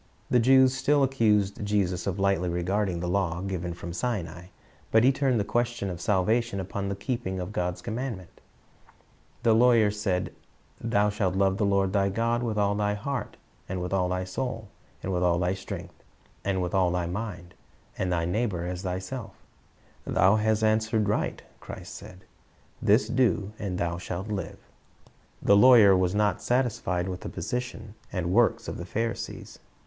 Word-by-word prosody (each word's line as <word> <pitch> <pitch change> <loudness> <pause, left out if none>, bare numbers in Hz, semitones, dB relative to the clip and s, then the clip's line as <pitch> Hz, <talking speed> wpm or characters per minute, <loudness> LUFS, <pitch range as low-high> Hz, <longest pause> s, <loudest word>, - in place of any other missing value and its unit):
The 125 - +5
Jews 130 +2 +5
still 145 +1 +2
accused 105 -7 +2
Jesus 100 -4 0
of 95 0 -1
lightly 95 -3 +1
regarding 90 +1 -1
the 90 - -2
law 90 -2 0
given 90 -2 -3
from 85 -1 -7
Sinai, 90 -5 -3 0.4
but 110 +1 +4
He 130 - +6
turned 130 -3 +1
the - - +1
question 120 -3 -1
of 90 -1 -7
salvation 105 +3 +1
upon 100 +1 -4
the 100 - -2
keeping 100 -3 -3
of 90 +2 -5
God's 90 -1 -2
commandments. 115 -5 -5 1.0
The 115 - +5
lawyer 115 -2 +5
said, 100 -3 -2 0.5
"Thou 105 -3 +2
shalt 95 -3 -1
love 95 0 +2
the 105 - +2
Lord 100 -1 +1
thy 100 -1 +2
God 115 +4 0
with 115 -3 -2
all 100 -1 +2
thy 105 0 0
heart, 135 +6 -4 0.3
and 95 -1 -2
with 90 +1 -4
all 90 -2 +1
thy 90 0 -1
soul, 110 +3 -4 0.3
and 95 - -2
with 90 - 0
all 90 -1 +3
thy 90 +1 +1
strength, 95 - -8 0.4
and 95 -2 0
with 90 - -3
all 95 -2 +3
thy 90 0 -1
mind; 90 -1 -5 0.4
and 95 -1 -2
thy 85 -2 0
neighbor 90 -2 -1
as 90 0 -4
thyself" 95 +5 -5 0.7
"Thou 95 +3 +4
hast 110 0 +1
answered 110 0 +2
right," 105 - -1 0.2
Christ - - -9
said; 90 0 -11 0.6
"this 105 +6 +4
do, 105 -6 +1
and 95 -3 -3
thou 85 0 -2
shalt 95 +3 -5
live." 95 -5 -4 0.9
The 100 - +5
lawyer 110 -3 +8
was 90 +1 +1
not 105 -2 +1
satisfied 110 -8 0
with 90 -1 -5
the - - -5
position 115 +2 -5 0.2
c^id 90 -3 -2
works 115 +5 +2
of - - -4
the 85 - -6
Pharisees. 115 +4 -4
100 Hz, 170 wpm, -27 LUFS, 90-115 Hz, 1.0 s, lawyer